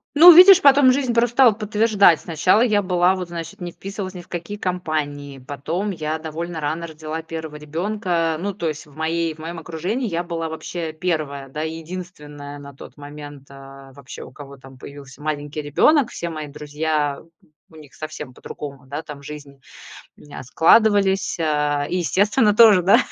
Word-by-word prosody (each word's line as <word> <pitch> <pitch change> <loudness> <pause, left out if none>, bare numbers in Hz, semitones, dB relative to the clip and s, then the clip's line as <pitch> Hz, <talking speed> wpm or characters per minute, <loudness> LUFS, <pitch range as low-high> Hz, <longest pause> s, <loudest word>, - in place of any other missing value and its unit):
Ну, 340 +4 +10
видишь, 370 +2 +9
потом 280 -4 +6
жизнь 255 -2 0
просто 235 +1 +1
стала 255 -3 +6
подтверждать. 210 -4 +3
Сначала 180 +6 +2
я 215 -4 +3
была, 180 -1 +2
вот, 185 -2 -5
значит, 170 -1 -8
не 175 -1 -5
вписывалась 195 +1 -7
ни 180 - -7
в 175 - -20
какие 175 +4 -6
компании, 155 -7 -4
потом 150 +9 -4
я 155 -3 -3
довольно 160 +1 -6
рано 155 +3 -3
родила 155 0 -6
1 160 -1 -7
ребёнка. 165 +1 -2
Ну, 200 +3 -3
то 175 -3 -4
есть 155 +1 -5
в 145 - -20
моей 160 +1 -2
в - - -21
моем 165 +2 -7
окружении 180 +10 -3
я 170 -1 -2
была 165 -2 -4
вообще 160 +1 -5
1, 155 -5 -3
да, 150 +3 -6
единственная 160 -3 -8
на 140 0 -11
тот 135 - -14
момент, 145 -1 -10
э, 135 0 -13
вообще, 135 -1 -11
у - - -12
кого 140 +1 -12
там 135 0 -15
появился 140 0 -12
маленький 150 0 -4
ребёнок. 245 - +3
Все 170 - -5
мои 155 -2 -6
друзья, 150 0 -3 0.5
у 160 - -19
них 150 -3 -15
совсем 155 -4 -8
по-другому, 140 +1 -9
да, 145 +3 -5
там 150 -3 -10
жизнь, 140 -1 -11 0.6
мня 145 - -11
складывались. 195 - +3
А, 150 -2 0
и 180 - -1
естественно, 205 +5 +2
тоже, 210 -5 +7
да, 195 - +5
160 Hz, 175 wpm, -21 LUFS, 145-185 Hz, 0.6 s, Ну